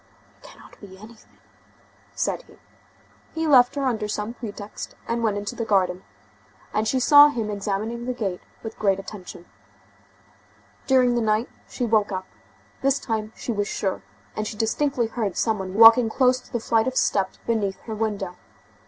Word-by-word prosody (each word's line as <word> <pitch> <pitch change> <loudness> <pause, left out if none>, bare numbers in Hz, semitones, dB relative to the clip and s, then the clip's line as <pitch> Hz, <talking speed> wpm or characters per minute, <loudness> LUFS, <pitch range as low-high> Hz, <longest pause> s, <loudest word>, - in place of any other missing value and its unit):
"It - - -29
cannot - - -17
be 190 -2 -12
anything," 215 +3 -16 0.8
said - - -1
he. - - -19 0.8
He 325 0 -1
left 255 -4 +5
her 280 -1 -1
under 225 -5 -1
some 210 +2 -3
pretext, 210 -3 -8
and 235 0 -1
went 215 -3 0
into 205 +4 -5
the 235 - -3
garden, 190 -4 +1 0.7
and 215 +1 0
she 260 +4 +1
saw 290 +3 +8
him 230 -7 -3
examining 210 +4 -3
the 250 - -1
gate 195 -7 -3 0.2
with 225 - -8
great 195 -3 +2
attention. 195 -3 -9 1.4
During 255 -2 +4
the 240 - +1
night 215 +2 +1 0.2
she 245 - -3
woke 215 -3 +2
up; 185 -1 -4 0.6
this 275 +1 +2
time 220 -4 -3
she - - -4
was 205 -2 -1
sure, 195 -3 -2 0.3
and 215 0 -3
she 210 - -7
distinctly 240 +3 0
heard 220 -4 -3
some 220 -3 +1
one 190 0 -6
walking 225 +1 +8
close 255 +2 +2
to - - -21
the 240 - -1
flight 225 +1 +1
of 260 0 -2
steps 190 -2 +1
beneath 210 -4 -1
her 225 - -7
window. 205 -4 -3
220 Hz, 170 wpm, -24 LUFS, 205-240 Hz, 1.4 s, saw